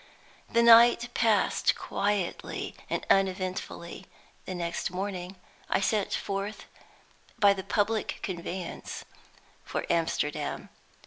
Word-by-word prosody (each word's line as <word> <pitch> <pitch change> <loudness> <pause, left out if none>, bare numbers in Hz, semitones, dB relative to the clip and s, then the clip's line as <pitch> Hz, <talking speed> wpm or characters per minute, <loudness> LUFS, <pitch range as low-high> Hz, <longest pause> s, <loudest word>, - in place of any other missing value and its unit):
The 235 0 +3
night 235 +1 +7
passed 220 -4 +2
quietly 200 -3 -2 0.2
and - - -2
uneventfully. 185 -2 -1 0.4
The 185 - -5
next 170 -1 -2
morning 185 0 -4 0.3
I - - +2
set 200 0 0
forth 200 +1 -4 0.7
by 200 -1 +6
the 190 -1 -6
public 215 +2 0
conveyance 180 -1 -5 0.6
for - - -3
Amsterdam. 160 -3 -1
195 Hz, 100 wpm, -28 LUFS, 180-210 Hz, 0.7 s, night